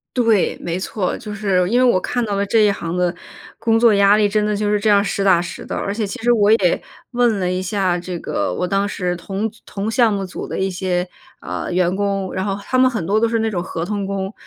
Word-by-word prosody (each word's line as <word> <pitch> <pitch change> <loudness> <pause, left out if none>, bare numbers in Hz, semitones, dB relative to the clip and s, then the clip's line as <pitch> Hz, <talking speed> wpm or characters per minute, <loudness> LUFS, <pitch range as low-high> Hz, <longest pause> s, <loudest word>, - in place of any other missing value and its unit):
对， 230 -6 +2
没 170 +1 -3
错， 190 0 -2
就 210 - -7
是 195 -3 +1
因 240 - +2
为 255 - +4
我 240 -7 +4
看 245 +6 -2
到 205 -2 -2
了 200 - 0
这 220 +3 +2
一 205 - +4
行 170 -3 -4
的 180 -1 +1 0.5
工 225 -1 +2
作 230 -1 +5
压 200 0 +5
力， 210 -1 +3
真 210 +1 +1
的 210 0 0
就 205 0 0
是 210 - +2
这 215 +1 +1
样 200 -1 +5
实 200 +1 -2
打 185 -3 +5
实 175 - -7
的。 - - -4
而 200 - -2
且 215 -1 -2
其 195 - -6
实 240 - +4
我 210 -3 +3
也 200 -5 +3 0.3
问 240 -3 +2
了 180 -2 -1
一 185 0 -1
下 185 -2 0
这 180 0 -5
个， - - -2
我 180 - -1
当 195 +2 0
时 180 -3 -2
同 195 +5 -3
组 225 - -22
同 205 +2 -4
项 230 -2 +3
目 195 -1 -2
组 185 - -7
的 - - -5
一 190 0 0
些， 180 -1 -1 0.4
呃， - - -5
员 180 0 +1
工， 195 -1 -2
然 190 0 -2
后 195 -1 -1
他 255 - -1
们 255 0 +5
很 220 -9 -3
多 205 +5 +2
都 230 - +2
是 230 0 0
那 225 0 0
种 180 -4 -2
合 165 -2 -4
同 205 +2 -3
工。 195 0 -3
200 Hz, 285 characters per minute, -19 LUFS, 185-215 Hz, 0.5 s, 作